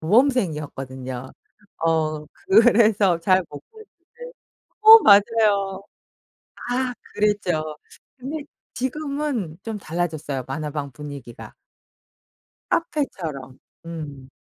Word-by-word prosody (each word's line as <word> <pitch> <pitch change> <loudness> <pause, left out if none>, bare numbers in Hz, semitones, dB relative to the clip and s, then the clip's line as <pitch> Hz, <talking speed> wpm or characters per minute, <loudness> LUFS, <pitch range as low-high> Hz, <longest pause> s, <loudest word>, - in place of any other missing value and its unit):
모범생이었거든요. 150 - 0 0.5
어 155 -2 0
그래서 220 - +4
잘 185 +2 +3
못 145 - -9
갔는데. 445 +3 -14 0.5
어 440 +1 +11
맞아요. 200 - +3 0.9
아 250 0 -1 0.2
그랬죠. 180 -7 0 0.4
근데 285 +4 -5 0.3
지금은 265 - -3
좀 225 -1 -5
달라졌어요 155 -7 -3
만화방 145 0 -4
분위기가. 140 -3 -10 1.2
카페처럼. 160 - -3 0.3
음. 145 -5 -8
185 Hz, 200 characters per minute, -23 LUFS, 150-250 Hz, 1.2 s, 어